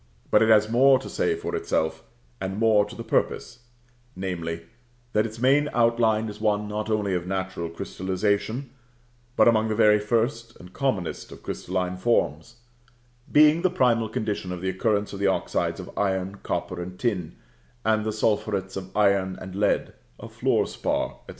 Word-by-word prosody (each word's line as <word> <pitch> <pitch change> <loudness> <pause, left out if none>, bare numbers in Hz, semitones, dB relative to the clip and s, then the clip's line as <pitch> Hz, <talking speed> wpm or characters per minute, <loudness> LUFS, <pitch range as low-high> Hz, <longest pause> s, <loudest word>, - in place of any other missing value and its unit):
But - - +5
it 110 - +4
has 110 -1 +6
more 130 +4 +5
to 130 - -8
say - - 0
for - - -4
itself, 80 - -1 0.4
and 95 +1 -3
more 110 -2 +4
to 105 - -10
the - - -6
purpose; 120 - -1 0.6
namely, 85 -3 -4 0.5
that 105 +1 +2
its 110 0 -10
main 140 +5 +3
outline 115 -2 +2
is 105 0 -8
one 105 -1 +1
not 105 +1 -3
only 105 -3 0
of 90 0 -2
natural 95 -3 -3
crystallisation, 100 +9 -2 0.6
but - - +5
among 110 -1 +4
the 110 - -1
very 105 -1 +5
first 115 +2 -1
and 90 +1 -13
commonest 105 -11 -2
of - - -12
crystalline 90 0 -3
forms, 115 -1 0 0.8
being 150 +2 +6
the 185 - +3
primal 120 - +2
condition 105 -4 -3
of 90 - -4
the 95 - -1
occurrence 100 +2 0
of 100 - -6
the 100 - +2
oxides 95 - 0
of - - -9
iron, 95 0 -1
copper, 90 -1 -3
and 90 +1 -7
tin, 90 - -2 0.5
of 110 -1 +2
the 110 - -1
sulphurets 105 -3 -1
of 95 0 -7
iron 100 -2 +2
and 95 0 -8
lead, 105 +1 +1 0.3
of - - -10
fluor - - +2
spar, - - -2
&c. - - -14
105 Hz, 170 wpm, -25 LUFS, 95-115 Hz, 0.8 s, has